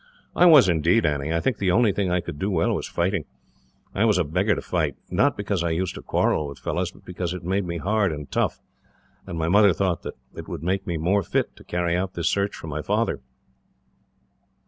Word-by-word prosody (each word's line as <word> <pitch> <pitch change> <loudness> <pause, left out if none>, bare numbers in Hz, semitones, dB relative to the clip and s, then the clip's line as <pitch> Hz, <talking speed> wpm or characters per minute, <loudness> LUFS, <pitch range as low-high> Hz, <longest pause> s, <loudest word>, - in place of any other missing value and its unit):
"I 180 - +6
was 150 - +8
indeed, 85 +5 +3
Annie. 75 0 -1
I 85 - +1
think 125 +5 -1
the 95 - +1
only 105 +4 +4
thing 100 -1 -1
I 90 0 +1
could 75 - -7
do 100 - -1
well 85 -5 +1
was - - -3
fighting. 85 -1 -1 0.7
I 100 - +1
was 110 -4 +3
a 90 - +3
beggar 90 +7 +1
to - - -4
fight 80 -6 -1 0.2
not 145 -1 +2
because 100 -3 -1
I 85 - 0
used 85 +3 -1
to - - -8
quarrel 75 - 0
with 70 - -9
fellows, - - -2
but - - -20
because 90 -1 -4
it 90 - -8
made 95 +3 0
me 85 0 -3
hard 100 +1 +1
and 75 -2 -6
tough, - - 0 0.7
and 85 - -5
my 80 0 -1
mother 100 +2 +5
thought 90 -2 -1
that - - -7 0.2
it - - -9
would - - -6
make 95 +3 -1
me 85 -2 -1
more 90 +6 +2
fit - - -1
to - - -15
carry 85 -1 -1
out 95 +1 -2
this 85 -1 0
search 100 0 0
for - - -9
my 75 -1 -4
father." - - -1
90 Hz, 230 wpm, -24 LUFS, 80-100 Hz, 0.7 s, was